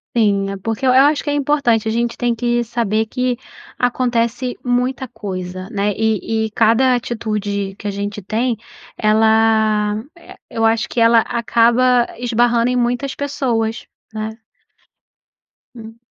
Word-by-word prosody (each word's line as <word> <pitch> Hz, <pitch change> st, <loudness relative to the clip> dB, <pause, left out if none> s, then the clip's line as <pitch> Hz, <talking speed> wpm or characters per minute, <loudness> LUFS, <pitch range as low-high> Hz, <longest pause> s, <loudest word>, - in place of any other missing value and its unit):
Sim, 200 Hz, -3 st, +2 dB
é, 195 Hz, -, -5 dB
porque 225 Hz, +6 st, -3 dB
eu 255 Hz, -, +4 dB
eu 260 Hz, -, +7 dB
acho 295 Hz, 0 st, +2 dB
que 295 Hz, -, -3 dB
é -, -, 0 dB
importante, 280 Hz, -6 st, +1 dB
a -, -, 0 dB
gente 235 Hz, +1 st, -1 dB
tem 240 Hz, -1 st, 0 dB
que 240 Hz, +1 st, 0 dB
saber 220 Hz, -1 st, -1 dB
que 250 Hz, +2 st, -1 dB, 0.4 s
acontece 245 Hz, 0 st, 0 dB
muita 250 Hz, +1 st, -1 dB
coisa, 185 Hz, -3 st, -6 dB
né, 205 Hz, 0 st, 0 dB
e 220 Hz, 0 st, 0 dB
e 220 Hz, -, -6 dB
cada 230 Hz, +4 st, +3 dB
atitude 210 Hz, -5 st, -3 dB
que 210 Hz, -, -5 dB
a -, -, -1 dB
gente 205 Hz, +1 st, -4 dB
tem, 230 Hz, +5 st, -1 dB, 0.4 s
ela, 220 Hz, -1 st, +3 dB, 0.2 s
eh, 340 Hz, -, -15 dB
eu 225 Hz, 0 st, 0 dB
acho 225 Hz, 0 st, +2 dB
que 240 Hz, -, -3 dB
ela 230 Hz, 0 st, +5 dB
acaba 235 Hz, +2 st, +2 dB
esbarrando 240 Hz, 0 st, +2 dB
em 250 Hz, -, 0 dB
muitas 245 Hz, +3 st, -1 dB
pessoas, 255 Hz, -6 st, -2 dB, 0.3 s
né. 215 Hz, 0 st, -3 dB, 1.5 s
Hum. 225 Hz, 0 st, -11 dB
230 Hz, 150 wpm, -18 LUFS, 215-245 Hz, 1.5 s, eu